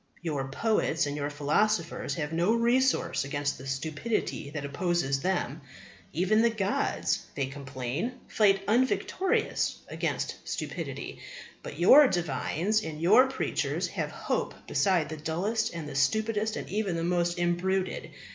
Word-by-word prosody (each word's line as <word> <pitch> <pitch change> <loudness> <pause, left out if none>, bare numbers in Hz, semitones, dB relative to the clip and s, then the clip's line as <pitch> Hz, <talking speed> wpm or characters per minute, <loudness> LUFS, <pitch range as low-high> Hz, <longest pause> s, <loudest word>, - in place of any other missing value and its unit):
Your 145 -5 -2
poets 160 +1 +1
and 145 0 -3
your 145 0 -2
philosophers 160 +5 0
have 155 -2 -3
no 175 +7 +2
resource 245 +3 +2
against 145 -1 -2
the 135 - -8
stupidity 145 - -2
that 145 -1 -5
opposes 140 -2 0
them. 170 -5 -1 0.5
"Even 190 +6 +2
the 235 - +4
gods," 205 -3 -1
they 140 - 0
complain, 135 - -4
"fight 195 -2 +3
unvictorious 260 - +1
against - - -2
stupidity." - - -5 0.4
But - - -8
your 290 0 +8
divines 175 - 0
and 155 -1 -6
your 215 +11 +6
preachers 265 - -1
have - - -3
hope - - -2
beside 185 -6 +2
the 155 - -5
dullest 195 +9 -1
and 165 -3 -6
the 145 - -7
stupidest 215 +10 +1
and - - -5
even 200 -3 -1
the 165 - -2
most 175 0 +1
imbruted. 180 +2 0
175 Hz, 135 wpm, -29 LUFS, 145-215 Hz, 0.5 s, your